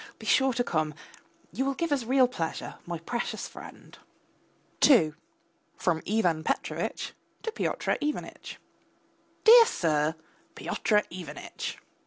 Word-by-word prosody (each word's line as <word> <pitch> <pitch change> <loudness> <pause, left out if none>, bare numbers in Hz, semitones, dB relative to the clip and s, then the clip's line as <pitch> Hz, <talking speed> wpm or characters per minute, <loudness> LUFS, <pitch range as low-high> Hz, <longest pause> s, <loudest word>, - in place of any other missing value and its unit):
Be - - -11
sure 265 -1 +4
to 245 - +1
come, 155 -7 -1 0.6
you 265 - -1
will 275 0 -1
give 335 0 -2
us 270 -5 +1
real 260 +1 +4
pleasure, 165 -10 -4
my 170 -1 -3
precious 235 +9 -4
friend. - - -12 0.8
II 165 - +6 0.6
(FROM 165 -3 0
IVAN 180 -7 +1
PETROVITCH - - -2 0.3
TO 450 - -2
PYOTR - - -1
IVANITCH) 300 0 -4 0.9
DEAR 465 +1 +10
SIR, 155 - +1 0.4
PYOTR 210 -1 +1
IVANITCH! 170 -4 -6
215 Hz, 120 wpm, -28 LUFS, 160-270 Hz, 0.9 s, DEAR